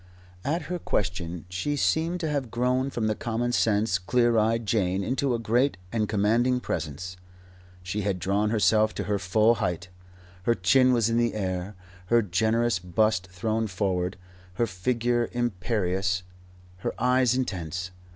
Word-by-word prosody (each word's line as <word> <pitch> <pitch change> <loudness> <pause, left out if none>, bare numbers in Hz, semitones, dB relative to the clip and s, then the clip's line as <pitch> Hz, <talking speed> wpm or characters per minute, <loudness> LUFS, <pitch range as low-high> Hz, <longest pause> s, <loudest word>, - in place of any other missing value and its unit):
At 155 +6 -1
her 180 0 -4
question 90 - -2
she 95 +12 -2
seemed 165 +4 +1
to 160 - -1
have 140 -5 -2
grown 125 +3 0
from 120 -4 -2
the 110 - +2
common 120 +2 -2
sense, 105 -4 +2
clear 120 +6 +2
eyed 115 +1 +2
Jane 100 -3 +1
into 130 +3 0
a - - 0
great 120 +1 +1
and 110 -2 0
commanding 115 +5 +2
presence. 90 - -4 0.7
She 95 +4 -3
had 100 -2 -1
drawn 100 +4 0
herself 110 0 +3
to - - -2
her 105 -1 -1
full 110 +5 +3
height. 90 0 -2 0.6
Her 120 - +3
chin 130 +8 +4
was 115 -3 +3
in 115 - +1
the 120 -2 +1
air, 95 -1 -3 0.3
her 120 +2 +4
generous 110 +4 +1
bust 90 +1 +1
thrown 110 +5 -1
forward, 95 -2 -1 0.4
her 120 - +2
figure 120 +4 0
imperious, 95 -5 -1 0.5
her 95 - -4
eyes 125 0 +3
intense. 90 -7 -3
110 Hz, 150 wpm, -26 LUFS, 95-120 Hz, 0.7 s, chin